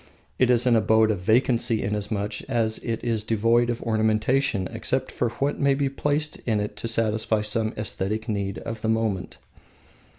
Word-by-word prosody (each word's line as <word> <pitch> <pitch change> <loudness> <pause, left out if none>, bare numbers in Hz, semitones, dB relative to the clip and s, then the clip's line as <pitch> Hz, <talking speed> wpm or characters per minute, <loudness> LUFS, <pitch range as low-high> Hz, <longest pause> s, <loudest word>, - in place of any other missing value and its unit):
It 130 - +4
is 120 -1 +4
an 120 -2 +4
Abode 110 0 +4
of 100 - -2
Vacancy 115 +2 +2
inasmuch 105 0 -2
as 115 -3 0
it 115 -1 -4
is 115 -3 -1
devoid 115 +2 +2
of 120 0 -3
ornamentation 110 -1 +1
except 130 +4 -2
for 120 - -1
what 140 +5 -2
may 140 -1 +3
be 140 0 0
placed 145 +2 -1
in 110 -3 +2
it 105 0 -4
to - - -4
satisfy 110 -1 +1
some 110 +1 0
aesthetic 105 0 -2
need 100 -2 -2
of 115 -1 -6
the 110 - -1
moment. 110 -5 -1
110 Hz, 170 wpm, -25 LUFS, 105-120 Hz, -, It